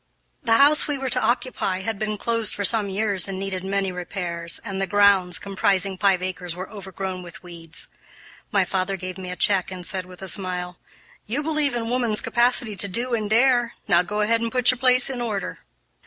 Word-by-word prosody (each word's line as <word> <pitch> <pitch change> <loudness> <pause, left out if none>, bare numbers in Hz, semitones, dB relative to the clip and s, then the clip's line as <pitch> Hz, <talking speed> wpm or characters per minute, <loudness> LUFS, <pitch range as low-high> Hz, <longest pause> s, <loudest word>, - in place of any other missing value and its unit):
The 230 - +1
house 290 +6 +5
we 290 -1 -2
were 265 -2 -4
to - - +4
occupy 225 -5 -1
had 220 0 -3
been 215 -1 -2
closed 230 0 +1
for 200 - -3
some 210 -1 +4
years 200 -1 +1
and 195 -1 -5
needed 190 -1 -4
many 195 0 -1
repairs, 175 -2 -1
and 195 -2 -4
the 195 - -1
grounds, 200 -4 +3
comprising 195 -1 0
five 185 -1 +2
acres, 180 -2 -4
were 185 +1 -6
overgrown 190 -2 -6
with 175 0 -12
weeds. 170 -2 -10 0.6
My 195 -2 +2
father 190 +1 -2
gave 185 0 -7
me 185 -1 -7
a 180 - -5
check 190 -1 +2
and 185 -2 -6
said, 185 0 -3
with 180 +1 -11
a - - -6
smile, 180 -1 -4 0.5
"You 265 +8 -2
believe 300 -4 +1
in 230 -1 -3
woman's 235 -3 +1
capacity 240 -2 +1
to 200 - 0
do 240 +6 -2
and 215 -3 -1
dare; 240 +1 +3
now 175 -4 +4
go 210 +4 -3
ahead 230 +2 +1
and 230 -1 -2
put 250 0 +4
your 255 - -6
place 255 0 +5
in 255 -3 -3
order." 215 -4 -4
200 Hz, 205 wpm, -23 LUFS, 185-230 Hz, 0.6 s, house